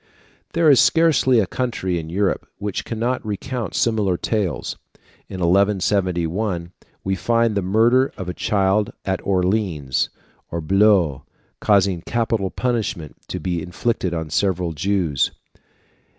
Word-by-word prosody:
There 165 -1 +3
is 140 -5 +7
scarcely 130 -1 +4
a 105 - +2
country 95 -5 -2
in 80 -1 -7
Europe 95 +2 -1
which 105 -2 -4
cannot 120 +3 -2
recount 115 +2 -4
similar 105 -6 +1
tales. 95 - -2 0.5
In 95 - -6
1171, 90 -1 +1 0.3
we 95 - -1
find 115 +3 +1
the 100 - 0
murder 115 +8 +3
of 95 - -6
a 90 - -3
child 100 0 +1
at 95 -1 -1
Orleans, 90 - 0 0.4
or 85 - -3
Blois, 95 -4 +3 0.4
causing 100 -4 +2
capital 115 -2 -1
punishment 110 - -2
to - - -4
be 90 -2 -2
inflicted 90 +3 -2
on 80 -2 -4
several 90 -2 0
Jews. 85 -3 0
100 Hz, 125 wpm, -21 LUFS, 90-110 Hz, 0.5 s, is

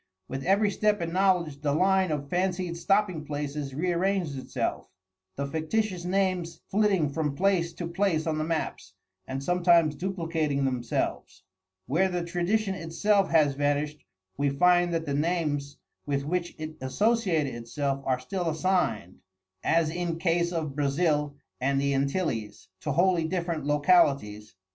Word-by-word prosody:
With 135 0 -5
every 200 +2 +3
step 210 +1 +1
in 170 -1 -3
knowledge 180 -6 +1
the 145 -2 +1
line 190 +1 +3
of 145 -2 -2
fancied 180 +1 -1
stopping 185 -1 +1
places 145 -2 -4
rearranged 175 -1 0
itself, 130 - -3 0.5
the 140 - -2
fictitious 175 +5 -2
names 185 -2 0
flitting 195 -8 +2
from 150 -3 -1
place 180 -1 +2
to 170 - -5
place 170 -2 0
on 155 -1 -1
the - - 0
maps, 155 - -3 0.3
and 135 +1 -4
sometimes 170 -1 +4
duplicating 160 -4 -1
themselves. 125 -3 -2 0.4
Where 175 +9 +2
the 175 -1 -2
tradition 190 +4 0
itself 190 +4 +1
has 155 -4 +4
vanished 145 +1 -1 0.3
we 140 0 +1
find 175 +5 +3
that 165 -1 -1
the 140 - -2
names 145 -2 -1 0.3
with 140 -1 0
which 175 +2 -2
it 155 0 -7
associated 180 - +1
itself 135 +4 -3
are 130 -1 0
still 175 +5 -2
assigned, 160 - 0 0.4
as 160 -1 +2
in 170 -1 -2
case 170 0 +1
of 155 -5 -3
Brazil 150 0 +1 0.2
and 135 +1 +1
the 140 0 +1
Antilles, 135 - -2
to 150 - -3
wholly 175 0 +3
different 170 -4 -2
localities. 140 - +2
165 Hz, 145 wpm, -27 LUFS, 145-180 Hz, 0.5 s, sometimes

